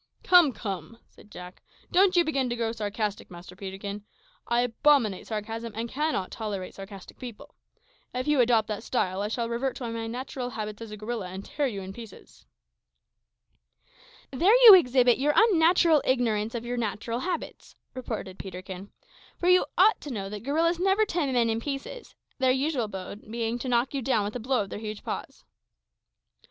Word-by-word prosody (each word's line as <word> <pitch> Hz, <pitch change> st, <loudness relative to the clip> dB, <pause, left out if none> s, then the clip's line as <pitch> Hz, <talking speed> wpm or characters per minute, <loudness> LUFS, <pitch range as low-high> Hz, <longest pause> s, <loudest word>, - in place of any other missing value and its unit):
"Come, 355 Hz, -6 st, +6 dB
come," 200 Hz, -3 st, -6 dB
said -, -, -19 dB
Jack; 180 Hz, -2 st, -11 dB, 0.3 s
"don't 375 Hz, +1 st, +4 dB
you 350 Hz, -, +5 dB
begin 275 Hz, -5 st, 0 dB
to 240 Hz, -, -2 dB
grow 230 Hz, -1 st, -1 dB
sarcastic, 210 Hz, -1 st, -3 dB
Master 175 Hz, +1 st, -11 dB
Peterkin. 200 Hz, +1 st, -6 dB, 0.4 s
I 235 Hz, 0 st, +2 dB
abominate 245 Hz, -4 st, +2 dB
sarcasm, 225 Hz, +1 st, -5 dB
and 230 Hz, +2 st, -3 dB
cannot 280 Hz, -7 st, -2 dB
tolerate 205 Hz, -4 st, -5 dB
sarcastic 195 Hz, 0 st, -11 dB
people. 245 Hz, -5 st, -10 dB, 0.6 s
If 255 Hz, +2 st, -3 dB
you 295 Hz, -2 st, +3 dB
adopt 230 Hz, -3 st, +3 dB
that 210 Hz, -1 st, -3 dB
style, 200 Hz, -6 st, -1 dB
I 205 Hz, -, -1 dB
shall 230 Hz, +2 st, -2 dB
revert 240 Hz, +3 st, -2 dB
to 245 Hz, -, -5 dB
my 225 Hz, 0 st, -4 dB
natural 250 Hz, +1 st, -5 dB
habits 215 Hz, -2 st, -6 dB
as 225 Hz, -, -7 dB
a 210 Hz, -, -8 dB
gorilla, 215 Hz, -2 st, -4 dB
and 190 Hz, +2 st, -8 dB
tear 290 Hz, -1 st, -1 dB
you 200 Hz, -6 st, -5 dB
in 190 Hz, +1 st, -8 dB
pieces." 225 Hz, -1 st, -13 dB, 1.8 s
"There 350 Hz, -, +4 dB
you 440 Hz, -, +13 dB
exhibit 250 Hz, -8 st, +5 dB
your 295 Hz, +2 st, +2 dB
unnatural 340 Hz, -6 st, +5 dB
ignorance 230 Hz, -3 st, 0 dB
of 235 Hz, 0 st, -4 dB
your 245 Hz, +1 st, -3 dB
own -, -, 0 dB
natural 230 Hz, +2 st, -3 dB
habits," 345 Hz, +3 st, -5 dB, 0.2 s
retorted 220 Hz, -7 st, -6 dB
Peterkin; 190 Hz, +1 st, -8 dB, 0.5 s
"for 355 Hz, -, +1 dB
you 365 Hz, 0 st, +5 dB
ought 405 Hz, +5 st, +5 dB
to 295 Hz, -, -7 dB
know 195 Hz, -5 st, -4 dB
that 205 Hz, 0 st, -6 dB
gorillas 325 Hz, +7 st, +1 dB
never 390 Hz, +3 st, +3 dB
tear 335 Hz, -8 st, -1 dB
men 240 Hz, -2 st, +2 dB
in 225 Hz, 0 st, 0 dB
pieces 290 Hz, -, -6 dB, 0.2 s
their 260 Hz, -1 st, +3 dB
usual 265 Hz, -3 st, 0 dB
mode 200 Hz, +1 st, -8 dB
being 230 Hz, +1 st, -2 dB
to 255 Hz, -, -4 dB
knock 240 Hz, +2 st, +1 dB
you 275 Hz, -, -2 dB
down 235 Hz, -4 st, +1 dB
with 210 Hz, -, -5 dB
a -, -, -2 dB
blow 250 Hz, -1 st, 0 dB
of 195 Hz, -, -11 dB
their -, -, -5 dB
huge 215 Hz, -1 st, -6 dB
paws." -, -, -6 dB
235 Hz, 180 wpm, -27 LUFS, 210-275 Hz, 1.8 s, you